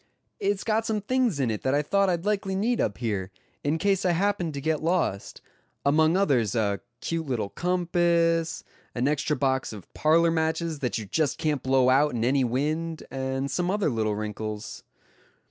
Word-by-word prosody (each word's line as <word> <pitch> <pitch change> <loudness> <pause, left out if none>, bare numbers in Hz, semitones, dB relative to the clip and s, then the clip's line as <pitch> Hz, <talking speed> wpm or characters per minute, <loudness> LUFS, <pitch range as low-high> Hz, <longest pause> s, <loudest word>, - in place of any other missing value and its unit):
"It's 200 0 0
got 220 0 +1
some 220 -2 -1
things 245 - +1
in 125 -4 +1
it 105 - -3
that 130 +1 +1
I 145 - +2
thought 200 +5 +2
I'd 175 0 -1
likely 200 -2 0
need 230 +5 +1
up 100 - -1
here, 100 -6 -2 0.3
in 150 +3 +1
case 195 +2 +1
I 180 -2 +2
happened 180 -3 0
to - - -3
get 155 +2 -1
lost; 160 - -1 0.4
among 155 +4 +4
others, 130 - +2
a 100 -3 +1 0.2
cute 165 -2 -3
little 120 -6 -1
compass, 170 - +1 0.3
an 125 +2 +1
extra 150 0 0
box 130 0 0
of 105 -5 -11
parlor 165 +2 +3
matches 160 -1 -1
that 125 -5 -1
you 110 - -5
just 145 +7 0
can't 150 -4 -1
blow 130 -1 +3
out 140 0 +3
in 115 0 0
any 135 +2 +3
wind, 155 +6 -1
and 135 +1 -2
some 175 +5 0
other 200 -5 +1
little 110 -2 0
wrinkles." 105 0 -5
155 Hz, 180 wpm, -26 LUFS, 130-175 Hz, 0.4 s, among